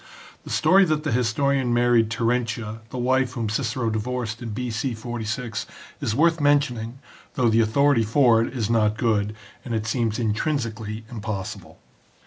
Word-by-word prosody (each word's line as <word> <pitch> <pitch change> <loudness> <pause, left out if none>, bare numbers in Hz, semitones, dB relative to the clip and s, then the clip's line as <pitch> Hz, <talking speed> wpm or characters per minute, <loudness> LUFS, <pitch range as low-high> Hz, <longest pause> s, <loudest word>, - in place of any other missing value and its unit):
The - - -9
story 195 +1 +4
that 155 -2 0
the 150 - -1
historian 125 +1 +1
married 120 -2 +3
Terentia, 115 -1 -1
the 130 - -6
wife 130 0 +1
whom 115 -4 -2
Cicero 115 +1 -1
divorced 115 +1 -3
in 120 - -5
B.C. 120 +2 -3
46, 115 0 -4 0.3
is 110 - -1
worth 165 +3 +3
mentioning, 130 -5 +1 0.4
though 125 -3 +3
the 115 +1 +4
authority 140 +3 +3
for 115 0 +4
it 115 - -2
is 120 -6 -2
not 110 -2 +2
good, 105 -2 0 0.3
and 120 -3 -3
it 110 -1 -2
seems 110 -1 0
intrinsically 110 -2 -2
improbable. 105 -4 -6
115 Hz, 150 wpm, -24 LUFS, 110-130 Hz, 0.4 s, story